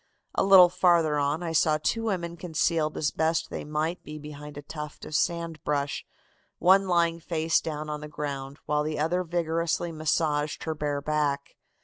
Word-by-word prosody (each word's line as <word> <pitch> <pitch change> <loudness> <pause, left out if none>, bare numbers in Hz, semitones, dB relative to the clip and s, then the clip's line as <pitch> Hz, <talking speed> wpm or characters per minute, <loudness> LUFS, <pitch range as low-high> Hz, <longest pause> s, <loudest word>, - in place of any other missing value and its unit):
A - - +1
little 190 -2 +9
farther 170 -4 +3
on 145 +4 0
I 165 - -2
saw 155 -1 +3
two 225 +9 -1
women 170 -5 -2
concealed 160 -2 0
as 150 - 0
best 160 +1 0
they - - -4
might 155 +3 -2
be 150 0 -8
behind 150 -1 -9
a 145 - -7
tuft 150 0 -8
of - - -9
sand 165 0 -1
brush, 145 -1 -1 0.5
one 190 +2 +5
lying 170 -2 +2
face 160 -1 +1
down 155 -1 -4
on 150 0 -4
the 150 - -6
ground, 140 -2 -5
while 150 0 +1
the 155 0 -2
other 170 +4 +1
vigorously 170 0 -1
massaged 155 -1 0
her 160 - -2
bare 145 -2 -2
back. 145 -2 -1
155 Hz, 175 wpm, -27 LUFS, 150-170 Hz, 0.5 s, little